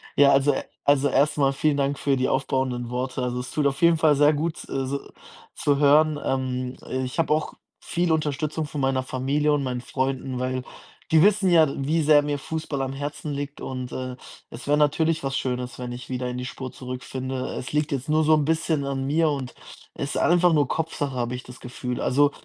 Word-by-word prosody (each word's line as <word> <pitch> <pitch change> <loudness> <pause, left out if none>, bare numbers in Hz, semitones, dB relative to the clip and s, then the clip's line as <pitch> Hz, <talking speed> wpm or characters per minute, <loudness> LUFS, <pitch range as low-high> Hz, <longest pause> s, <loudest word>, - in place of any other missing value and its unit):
Ja, 140 -1 +6
also 140 +1 +4 0.3
also 145 0 +4
erst 145 +2 +2
mal 135 -1 +3
vielen 145 +1 +1
Dank 140 0 0
für 140 -1 +1
die 130 0 +1
aufbauenden 130 -3 -1
Worte. 125 +1 -3
Also, 125 0 -2
es 125 0 -6
tut 150 - 0
auf 135 -1 -2
jeden 170 -1 +5
Fall 155 -2 +4
sehr 145 +2 +5
gut, 155 +2 -2
äh, 135 -1 -2
so 140 +2 -2 0.6
zu 145 -1 +1
hören, 150 +1 +4
ähm. 130 -1 -2 0.3
Ich 130 +6 -5
habe 155 -2 +3
auch 155 0 -1 0.3
viel 175 -1 -1
Unterstützung 155 0 -1
von 145 -1 -5
meiner 135 -1 +1
Familie 140 +4 0
und 145 - +1
meinen 125 -2 -3
Freunden, 130 0 -2
weil 130 0 -2 0.5
die 160 -1 +6
wissen 205 -1 +4
ja, 165 -3 +6
wie 150 +4 +1
sehr 150 -1 +6
mir 145 0 -2
Fußball 155 -2 -4
am 135 0 -2
Herzen 145 +2 -5
liegt 145 +1 -5
und, 130 -1 -5
äh, 130 -1 -4 0.3
es 115 - -10
wär 145 +1 +3
natürlich 155 +2 +2
was 135 0 -1
Schönes, 125 -1 -3
wenn 125 -1 -5
ich 120 0 -9
wieder 125 -1 -2
in 125 - -4
die 125 - -4
Spur 130 0 -6
zurückfinde. 130 0 -5
Es 125 - -5
liegt 150 +1 0
jetzt 140 0 -3
nur 155 +1 +3
so 155 +1 +4
'n 150 -2 +1
bisschen 160 -1 0
an 135 -1 -2
mir 155 +3 +2
und 135 -3 -4 0.4
ist 140 - -3
einfach 175 0 +4
nur 145 -3 +3
Kopfsache, 150 -3 -2
habe 120 0 -2
ich 125 - -7
das 125 0 -12
Gefühl. 125 0 -5
Also, 145 +2 +3
140 Hz, 210 wpm, -24 LUFS, 130-150 Hz, 0.6 s, Ja